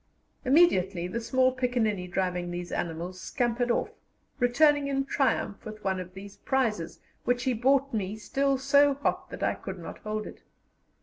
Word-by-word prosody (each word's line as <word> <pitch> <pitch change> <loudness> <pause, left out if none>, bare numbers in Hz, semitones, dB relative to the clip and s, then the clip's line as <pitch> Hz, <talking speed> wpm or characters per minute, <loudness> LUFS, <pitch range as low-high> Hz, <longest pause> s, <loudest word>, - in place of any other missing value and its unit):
Immediately 195 - +3
the 235 +5 -3
small 255 +2 +3
piccaninny 240 -7 0
driving 180 -1 -1
these 175 0 -5
animals 175 +2 -4
scampered 240 0 -1
off, 235 - 0 0.5
returning 285 +3 +4
in 275 -1 0
triumph 260 -7 0
with 215 -1 -9
one 190 -1 0
of 185 0 -8
these 200 +1 -10
prizes, 215 -8 -1 0.2
which 245 0 +1
he 260 - +1
brought 270 +3 +2
me 205 -2 -2
still 275 +5 0
so 280 +1 +4
hot 280 - -2
that - - -6
I - - +2
could - - -7
not - - -8
hold 215 -1 -4
it. - - -10
235 Hz, 165 wpm, -28 LUFS, 190-265 Hz, 0.5 s, returning